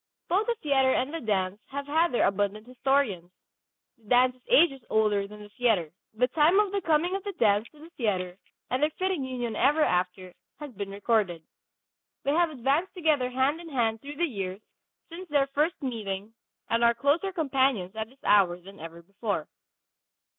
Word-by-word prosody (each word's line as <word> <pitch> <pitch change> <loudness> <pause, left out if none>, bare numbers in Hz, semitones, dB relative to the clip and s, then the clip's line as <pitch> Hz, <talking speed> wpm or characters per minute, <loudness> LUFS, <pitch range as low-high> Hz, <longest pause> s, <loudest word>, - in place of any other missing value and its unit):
Both 390 +5 +1
the 475 - +1
theatre 270 -3 +3
and 260 +4 -1
the 330 - -3
dance 200 -2 -1
have 280 +1 -5
had 320 +4 +2
their 240 - +2
abundant 205 +2 -1
historians. 250 -8 0 0.7
The 225 - -26
dance 250 +1 +4
is 255 - -27
ages 335 - +4
older 210 -2 +2
than 210 +1 -12
the 205 - -13
theatre. 210 - +1 0.2
The 250 +3 +2
time 320 +8 +4
of 415 -2 +2
the 400 0 -1
coming 335 +3 +1
of 390 - -4
the 405 - -4
dance 210 - +2
to 305 - -22
the 325 +3 -13
theatre 185 - -2 0.4
and 255 +2 0
their 300 - +3
fitting 370 -6 -1
union 245 -3 -4
ever 295 +7 +3
after 180 -3 -1 0.3
has 295 -2 -7
been 200 -3 -6
recorded. 200 -4 0 0.8
They 280 - +1
have 340 +1 +3
advanced 290 +7 -1
together 305 -7 +1
hand 265 +6 0
in 335 - -10
hand 225 -5 0
through 290 +1 -8
the 345 - +1
years 195 - -5 0.5
since 350 +1 -9
their 285 -2 +3
first 295 +5 -1
meeting 215 -4 -4 0.3
and 230 +1 +1
are 235 0 +5
closer 300 +10 +1
companions 265 - 0
at 220 0 -4
this 265 +2 -24
hour 190 -4 +4
than 195 +3 -14
ever 165 +1 -10
before. 195 -2 -3
250 Hz, 185 wpm, -27 LUFS, 205-300 Hz, 0.8 s, are